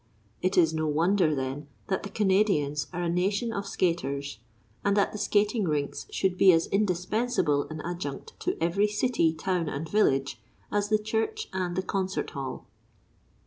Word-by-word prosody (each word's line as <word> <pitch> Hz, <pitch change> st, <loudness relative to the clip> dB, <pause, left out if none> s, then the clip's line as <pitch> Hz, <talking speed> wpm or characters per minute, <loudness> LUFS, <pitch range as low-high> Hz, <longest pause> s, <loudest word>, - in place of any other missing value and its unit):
It 185 Hz, -, 0 dB
is 165 Hz, -3 st, +5 dB
no 155 Hz, 0 st, -1 dB
wonder, 165 Hz, +1 st, +2 dB
then, 135 Hz, +2 st, -4 dB, 0.2 s
that 190 Hz, -, -1 dB
the 200 Hz, -, -6 dB
Canadians 190 Hz, -8 st, +1 dB
are 175 Hz, 0 st, -3 dB
a -, -, 0 dB
nation 200 Hz, +7 st, 0 dB
of 200 Hz, 0 st, -3 dB
skaters, 140 Hz, -, -1 dB, 0.4 s
and 200 Hz, 0 st, +2 dB
that 200 Hz, -, +3 dB
the 210 Hz, -, -6 dB
skating 210 Hz, 0 st, +1 dB
rinks 145 Hz, -2 st, -2 dB
should 185 Hz, -1 st, -1 dB
be 190 Hz, -, +8 dB
as 165 Hz, 0 st, +3 dB
indispensable 185 Hz, -5 st, 0 dB
an 155 Hz, 0 st, -6 dB
adjunct 170 Hz, -5 st, -5 dB
to -, -, -2 dB
every 175 Hz, +6 st, +2 dB
city, 210 Hz, -5 st, +1 dB
town, 165 Hz, +1 st, -1 dB
and 150 Hz, +4 st, -4 dB
village 140 Hz, -9 st, +1 dB, 0.3 s
as 205 Hz, 0 st, 0 dB
the 215 Hz, -, +4 dB
church 225 Hz, -, -2 dB
and 180 Hz, -2 st, -2 dB
the 185 Hz, -, -1 dB
concert 190 Hz, 0 st, -2 dB
hall. 135 Hz, -3 st, -5 dB
180 Hz, 165 wpm, -28 LUFS, 155-205 Hz, 0.4 s, be